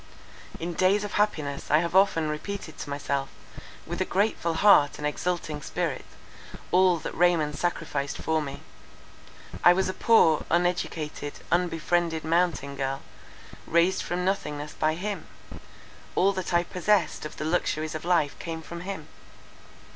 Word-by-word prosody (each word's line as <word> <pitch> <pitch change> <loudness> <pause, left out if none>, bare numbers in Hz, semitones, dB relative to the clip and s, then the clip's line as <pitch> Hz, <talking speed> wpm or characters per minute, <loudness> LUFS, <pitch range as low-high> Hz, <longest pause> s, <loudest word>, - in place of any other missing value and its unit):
In 170 +1 -3
days 190 +4 +3
of 205 - -5
happiness 155 -9 -1
I 150 - +5
have 170 +2 -1
often 190 -5 +4
repeated 160 +3 -5
to - - -6
myself, 140 -1 -2 0.6
with - - -4
a - - +5
grateful 185 -4 0
heart 160 -6 +5
and 150 - -5
exulting 155 0 -2
spirit, - - -3 0.7
all 180 -1 +5
that 160 - -6
Raymond 165 -4 +2
sacrificed 150 -4 -2
for 160 -1 0
me. 140 -2 -6 1.0
I 175 - +8
was 185 +1 0
a - - -2
poor, 180 -11 +4
uneducated, 165 -4 -1 0.2
unbefriended, 170 -1 +1
mountain 160 -4 0
girl, 135 0 -3 0.6
raised 170 +3 +3
from 180 +1 -2
nothingness 150 -6 -2
by 155 0 0
him. 200 +4 -4 0.9
All 195 +2 +3
that 185 -1 -4
I 175 0 +3
possessed 180 -1 +1
of 155 - -7
the 155 - -4
luxuries 155 -1 0
of 155 - -5
life 170 -5 +2
came 165 -1 -5
from 170 +1 -8
him. 185 -4 -6
170 Hz, 145 wpm, -27 LUFS, 150-180 Hz, 1.0 s, I